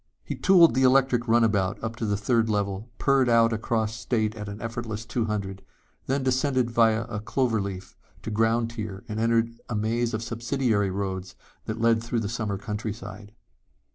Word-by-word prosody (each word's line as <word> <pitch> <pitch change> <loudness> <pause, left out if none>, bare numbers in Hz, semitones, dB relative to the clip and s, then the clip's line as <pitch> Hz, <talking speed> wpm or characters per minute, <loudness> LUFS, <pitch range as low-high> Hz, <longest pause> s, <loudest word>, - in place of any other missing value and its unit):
He - - -4
tooled 175 -6 +6
the 130 - +1
electric 130 -2 +3
runabout 110 -4 +2
up 110 - -1
into 115 -1 -4
the 100 -1 0
third 115 +2 +1
level, 100 +1 -2
purred 135 -2 +3
out 115 -1 +4
across 110 0 -1
state 115 -2 -1
at 105 -1 -6
an 100 +1 -7
effortless 115 -2 -5
two 115 -1 -1
hundred, 100 -3 -4 0.4
then 135 +1 0
descended 130 -1 +1
via 115 -1 +3
a 105 - -5
cloverleaf 105 -5 -2 0.3
to 110 - -4
ground 115 +2 +1
tier 105 -4 -6
and 110 0 -4
entered 115 0 +2 0.2
a 115 - -2
maze 115 +2 0
of 110 - -4
subsidiary 115 -3 0
roads 95 -1 -4 0.3
that 110 +1 -4
led 115 0 +3
through 115 0 -1
the 105 - -2
summer 110 -3 -2
countryside. 105 -1 -6
115 Hz, 170 wpm, -26 LUFS, 105-120 Hz, 0.4 s, tooled